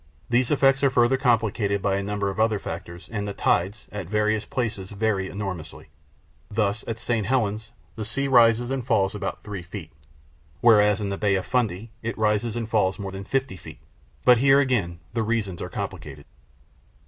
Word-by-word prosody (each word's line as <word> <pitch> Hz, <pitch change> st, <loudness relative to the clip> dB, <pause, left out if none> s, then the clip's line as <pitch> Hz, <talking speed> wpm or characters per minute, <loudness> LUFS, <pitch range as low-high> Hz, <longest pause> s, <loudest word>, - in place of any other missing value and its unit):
These 120 Hz, 0 st, +3 dB
effects 135 Hz, -1 st, +3 dB
are 140 Hz, -, +5 dB
further 120 Hz, 0 st, +3 dB
complicated 110 Hz, -5 st, +1 dB
by 100 Hz, 0 st, 0 dB
a -, -, -1 dB
number 100 Hz, 0 st, -1 dB
of 95 Hz, -, -7 dB
other 110 Hz, -1 st, +3 dB
factors, 85 Hz, -1 st, -7 dB
and 105 Hz, -2 st, -3 dB
the 100 Hz, -, -5 dB
tides, 100 Hz, +4 st, 0 dB
at 100 Hz, -4 st, -5 dB
various 105 Hz, 0 st, +1 dB
places, 105 Hz, -6 st, -3 dB
vary 100 Hz, -2 st, -1 dB
enormously. 95 Hz, -5 st, -6 dB, 0.6 s
Thus 105 Hz, 0 st, 0 dB
at 115 Hz, -, -3 dB
St. 115 Hz, -3 st, -1 dB
Helena 110 Hz, -5 st, +1 dB, 0.4 s
the 110 Hz, -, -4 dB
sea 125 Hz, +6 st, -1 dB
rises 120 Hz, -1 st, +4 dB
and 135 Hz, -2 st, -2 dB
falls 105 Hz, -5 st, +1 dB
about 100 Hz, -2 st, -5 dB
three 100 Hz, -3 st, -6 dB
feet, 85 Hz, -1 st, -9 dB, 0.7 s
whereas 105 Hz, -3 st, +5 dB
in 100 Hz, -, -2 dB
the 100 Hz, -, -4 dB
Bay 100 Hz, -2 st, +2 dB
of 95 Hz, -2 st, -2 dB
Fundy 115 Hz, -2 st, -1 dB
it 115 Hz, -1 st, -4 dB
rises 110 Hz, +1 st, +1 dB
and 115 Hz, -2 st, -3 dB
falls 100 Hz, -4 st, +1 dB
more 100 Hz, -2 st, -5 dB
than 95 Hz, 0 st, -7 dB
fifty 135 Hz, -7 st, -1 dB
feet. -, -, -11 dB, 0.5 s
But 125 Hz, -2 st, +7 dB
here, 135 Hz, +1 st, +5 dB
again, 115 Hz, -11 st, 0 dB, 0.2 s
the 115 Hz, -, 0 dB
reasons 110 Hz, -5 st, -1 dB
are -, -, -4 dB
complicated. -, -, -6 dB
105 Hz, 185 wpm, -25 LUFS, 100-120 Hz, 0.7 s, But